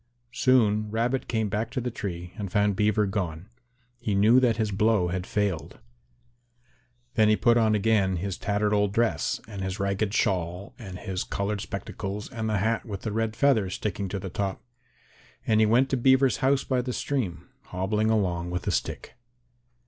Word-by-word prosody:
Soon 110 -5 +3
Rabbit 120 +4 -1
came 110 -2 0
back 110 +3 -2
to 130 +2 -3
the 125 0 -3
tree 90 -5 -6
and 100 -3 -5
found 105 -1 +2
Beaver 105 +1 +2
gone. 95 -3 -3 0.5
He 110 -4 -1
knew 110 +6 +6
that 120 -3 +2
his 110 -2 0
blow 100 -2 +2
had 90 +1 -3
failed. 100 -6 -2 1.4
Then 110 -2 +4
he 110 - +5
put 120 +2 +3
on 110 -2 +3
again 100 -3 +2
his 95 +2 -3
tattered 105 +1 0
old 105 -1 +2
dress 105 - +1
and 100 -3 -7
his 95 +2 -3
ragged 100 +1 0
shawl 90 0 -1
and 95 -5 -8
his 90 0 -3
coloured 100 0 -2
spectacles 100 +2 -5
and 110 -2 -3
the 105 - +1
hat 110 +4 0
with 100 -4 -6
the 110 - -2
red 110 0 -1
feather 120 -9 +3
sticking 100 0 -3
to 100 - -3
the 95 -1 -6
top, 95 0 -3 0.8
and 110 -1 +3
he 110 - +5
went 125 +5 +4
to 135 - +2
Beaver's 130 +1 +4
house 135 +1 +2
by 130 -2 0
the 125 0 -4
stream, 120 -13 -3 0.2
hobbling 105 +4 -1
along 90 -5 0
with 90 0 -3
a - - 0
stick. - - -3
105 Hz, 180 wpm, -26 LUFS, 95-115 Hz, 1.4 s, knew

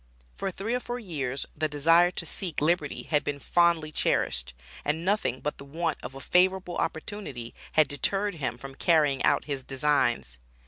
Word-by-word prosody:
For 195 - -2
three 195 +5 -3
or 250 - +1
four 245 -1 -5
years 140 - -3
the 155 0 -1
desire 165 +4 +5
to 175 -1 -3
seek 175 -1 -3
liberty 155 -1 0
had 150 -2 +1
been 145 - -2
fondly 170 0 +2
cherished, 60 - 0 0.3
and 160 +3 -1
nothing 195 - 0
but 150 - -3
the - - -8
want 160 +3 -2
of 130 +2 -8
a - - -7
favorable 180 +3 +2
opportunity 160 - -4 0.2
had 155 -1 +5
deterred 195 +8 0
him 125 -3 -2
from 135 +2 -9
carrying 150 -3 +3
out - - +3
his 140 -3 -3
designs. 130 - +1
155 Hz, 175 wpm, -28 LUFS, 135-175 Hz, 0.3 s, desire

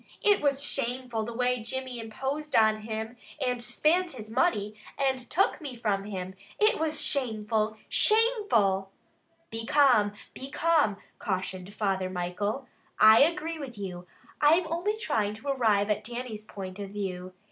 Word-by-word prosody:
It 410 -1 +4
was 280 -1 +1
shameful 250 -5 -2
the 235 - -5
way 250 0 0
Jimmy 255 +2 -5
imposed 270 +7 -4
on 220 -1 +4
him, 220 +2 -5 0.2
and 250 -3 -1
spint 330 +8 +1
his 220 -4 -9
money, 225 - +1 0.2
and 265 -2 +1
took 385 0 +1
me 275 -5 -6
from 205 -4 -1
him. 190 -2 -5 0.2
It 425 -4 +3
was 315 -1 +2
shameful! 220 -4 +1
Shameful!" 410 - +3 0.6
"Be 225 0 -4
calm! 250 -8 +4 0.2
Be 265 - -8
calm!" 305 -10 +2 0.2
cautioned 190 -1 -4
Father 190 -3 -1
Michael. 185 +8 -3 0.3
"I 220 +1 +8
agree 330 +1 +1
with 255 -6 -8
you. 180 -3 -6 0.3
I 295 +1 +6
am 355 0 0
only 410 +6 -1
trying 215 - -1
to 270 +6 -7
arrive 215 -6 +2
at 210 +1 -1
Dannie's 235 -2 -6
point 190 -2 -8
of 200 -1 -5
view. 185 -2 -5
230 Hz, 150 wpm, -28 LUFS, 205-280 Hz, 0.6 s, I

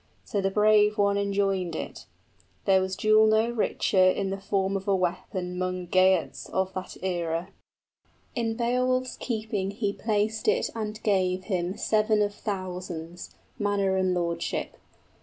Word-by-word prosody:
} - - -39
So 200 - -1
the 195 - +1
brave 210 +1 +4
one 200 -1 +3
enjoined 195 -3 0
it; - - -6 0.6
there 190 -1 +5
was 190 0 -2
jewel 215 +2 +5
no 220 +2 +3
richer 210 -4 +2
In 190 +1 +2
the 195 0 -4
form 195 0 0
of 195 +1 -4
a 200 - +3
weapon 180 0 -2
'mong 185 -1 -3
Geats 185 -2 +2
of 190 0 -1
that 185 0 -6
era; 175 -1 -2 0.8
In 230 -2 -1
Beowulf's 255 +2 0
keeping 215 -5 -2
he 200 0 -2
placed 215 - -1
it 465 +3 +2
and 215 -1 -4
gave 185 -3 +1
him 185 -2 -1
50 - - -14
Seven 215 -1 +2
of 205 0 -1
thousands, 180 -4 -6 0.2
manor 200 -2 +1
and 185 -1 +1
lordship. 170 -1 -2
195 Hz, 155 wpm, -27 LUFS, 185-215 Hz, 0.8 s, there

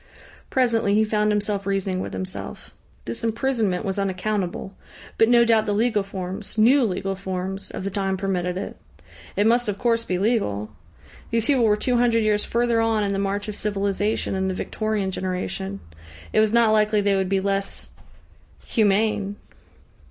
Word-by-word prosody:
Presently 230 -5 +2
he 215 - +4
found 210 0 +1
himself 205 -1 -1
reasoning 195 -1 -1
with - - -4
himself. 185 0 -6 0.3
This 235 0 -3
imprisonment 225 -4 0
was 195 0 -2
unaccountable, 195 -1 -2 0.5
but 225 - +5
no 240 -1 +6
doubt 220 -2 +3
the 205 - +1
legal 220 -1 +2
forms 195 +2 -6
new 250 +6 +5
legal 195 -2 -1
forms 190 0 -4
of - - -6
the 200 - -3
time 195 -1 -1
permitted 180 -2 -1
it. 195 - -5 0.6
It 205 - +2
must, 240 0 +3
of 200 - -2
course, 230 -1 +1
be 180 -5 -2
legal. 180 - 0 0.6
These 230 -1 +1
people 260 -4 +3
were 210 -1 +3
two 245 +3 +1
hundred 235 -2 +3
years 210 -1 +2
further 235 -1 +1
on 225 -2 +1
in 200 -1 0
the 195 - -1
march 200 +1 -2
of 210 - -4
civilisation 205 0 -1
than 190 0 0
the 190 - -2
Victorian 215 -1 -2
generation. 180 - -3 0.5
It - - +4
was 215 -1 +3
not 230 -1 +4
likely 215 -1 +3
they 200 -1 +2
would 190 -1 0
be 195 0 +2
less 195 0 -2 0.7
humane. 205 -2 +1
205 Hz, 170 wpm, -23 LUFS, 195-225 Hz, 0.7 s, no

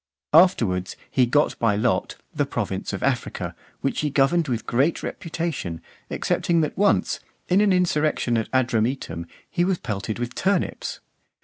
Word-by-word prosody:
Afterwards 115 - +4 0.2
he 125 -2 +3
got 145 +5 +2
by 115 -3 +3
lot 105 -3 0 0.2
the - - 0
province - - -3
of - - -4
Africa, - - -1 0.3
which 135 - -1
he 150 - 0
governed 150 +4 +3
with 115 -4 -2
great 140 +7 +1
reputation, 160 - -3 0.3
excepting 170 -1 +1
that 155 - -1
once, 200 +1 +2 0.3
in 185 +3 +4
an 210 -2 +4
insurrection 155 -8 +2
at 110 -1 -1
Adrumetum, 115 -9 0 0.2
he 175 - 0
was 185 0 +1
pelted 105 -3 -4
with 120 +1 -3
turnips. 195 -1 -1
135 Hz, 145 wpm, -24 LUFS, 115-170 Hz, 0.3 s, Afterwards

